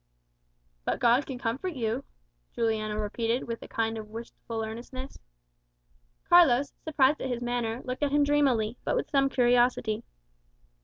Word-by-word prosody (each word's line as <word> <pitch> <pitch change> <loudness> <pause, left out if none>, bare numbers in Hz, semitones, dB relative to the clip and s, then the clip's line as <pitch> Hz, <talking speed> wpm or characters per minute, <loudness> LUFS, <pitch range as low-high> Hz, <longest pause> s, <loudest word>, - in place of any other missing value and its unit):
"But - - -1
God 245 +3 +3
can 265 - -5
comfort 265 +10 -3
you," 235 +1 -1 0.5
Juliano 215 -2 0
repeated 225 +3 -1
with 230 -1 -5
a - - -9
kind 225 0 -1
of 215 -1 -9
wistful 225 0 -6
earnestness. 250 +4 -7 1.1
Carlos, 285 -6 +5
surprised 295 -2 +2
at 265 - -2
his 245 -1 -2
manner, 240 -1 -2
looked 255 +2 -4
at 290 -1 +1
him 290 0 +4
dreamily, 260 -6 +2
but - - 0
with - - -2
some 275 -2 +3
curiosity. 240 -3 +2
245 Hz, 145 wpm, -28 LUFS, 225-275 Hz, 1.1 s, Carlos